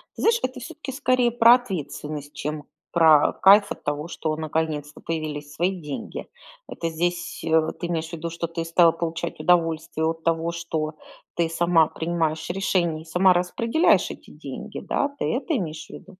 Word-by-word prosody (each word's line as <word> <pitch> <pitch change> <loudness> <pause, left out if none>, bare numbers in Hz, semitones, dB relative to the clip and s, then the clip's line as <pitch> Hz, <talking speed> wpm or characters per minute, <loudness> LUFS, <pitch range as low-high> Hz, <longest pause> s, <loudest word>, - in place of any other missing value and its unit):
Знаешь, 460 +1 +2
это 255 0 -2
всё-таки 300 0 -7
скорее 255 -3 +2
про 235 0 +7
ответственность, 150 - -5
чем 150 0 -4 0.3
про 160 -3 +5
кайф 200 +1 +7
от - - -6
того, 145 +2 -2
что 160 -2 -3
наконец-то 155 -1 -3
появились 150 -2 -4
свои 180 +1 -1
деньги. 145 -2 -6 0.4
Это 165 - -4
здесь, 175 +2 -2
э, 160 -1 +2
ты 175 - -3
имеешь 165 -1 -2
в - - -14
виду, 170 0 -4
что 170 0 -4
ты 165 0 -4
стала 165 0 +5
получать 165 0 -4
удовольствие 165 -1 +1
от 165 0 -2
того, 165 0 0
что 160 -2 -3 0.4
ты 170 -1 +1
сама 165 -1 +3
принимаешь 160 -1 -2
решения 175 -4 0
и - - -14
сама 180 +3 +4
распределяешь 230 - +2
эти - - -12
деньги. - - -8
Да, 285 - 0
ты - - -2
это 290 +6 -1
имеешь 160 -6 -5
в - - -28
виду? - - -11
165 Hz, 170 wpm, -24 LUFS, 160-180 Hz, 0.4 s, про